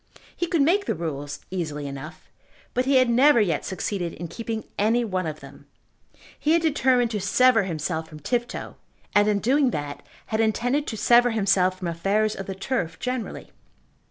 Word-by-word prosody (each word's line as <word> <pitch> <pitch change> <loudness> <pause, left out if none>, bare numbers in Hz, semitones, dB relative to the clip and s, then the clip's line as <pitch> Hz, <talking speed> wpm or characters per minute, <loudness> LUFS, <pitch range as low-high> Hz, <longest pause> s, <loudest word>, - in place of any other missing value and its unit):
He 345 - -2
could 330 -4 +2
make 390 +7 +2
the - - 0
rules 145 -3 -5
easily 155 -6 -3
enough, 140 -1 -8 0.5
but 250 +1 +1
he 275 +1 +2
had 255 -1 +5
never 250 +3 +5
yet 175 -8 +1
succeeded 185 -2 -3
in 170 0 -7
keeping 225 +1 -4 0.2
any 230 +4 +2
one 185 -5 -2
of 155 -1 -6
them. - - -14 0.7
He 310 - +2
had 335 0 +3
determined 255 -6 +2
to 210 -3 -2
sever 225 +2 +4
himself 160 -1 -3
from 155 - -11
Tifto, 240 - -3 0.4
and, 205 0 +4
in 210 -1 +2
doing 265 +6 +2
that, 145 -7 -4 0.2
had 220 - -2
intended 245 +6 +1
to 220 - -4
sever 240 +3 +5
himself 195 -4 +2
from 185 -2 -4
affairs 195 +6 0
of 195 - -7
the 195 - -4
turf 190 -5 -2
generally. 250 -2 -4
210 Hz, 180 wpm, -24 LUFS, 170-245 Hz, 0.7 s, had